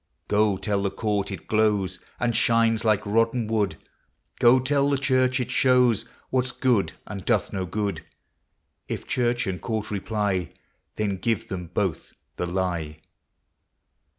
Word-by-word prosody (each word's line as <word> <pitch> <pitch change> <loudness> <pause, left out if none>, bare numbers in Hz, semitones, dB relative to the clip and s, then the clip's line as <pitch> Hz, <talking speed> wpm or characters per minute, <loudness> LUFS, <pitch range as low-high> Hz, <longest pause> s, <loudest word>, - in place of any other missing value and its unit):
Goe 105 -1 +2
tell 100 +1 -1
the 100 - 0
court 105 -1 -1
it 95 - -7
glowes 105 -4 +1 0.2
And 120 -2 0
shines 115 -1 +3
like 105 -2 +2
rotten 115 +3 +1
wood; 105 -6 0 0.6
Goe 120 +2 +6
tell 140 +2 +2
the 140 - +2
church 130 -1 +2
it 125 - -3
showes 125 -4 +3 0.3
What 130 -1 +2
\s 125 - -3
good, 125 -7 +1
and 100 -2 -7
doth - - +1
no 95 -2 -2
good; 100 -4 -2 0.8
If - - -4
church 120 -1 0
and 95 -2 -3
court 110 -2 -3
reply, 100 -3 -1 0.4
Then 100 -3 -1
give 115 +1 -1
them 90 -2 -5
both - - -2 0.2
the 90 - -2
lye. 85 -4 -2
105 Hz, 150 wpm, -25 LUFS, 95-120 Hz, 0.8 s, Goe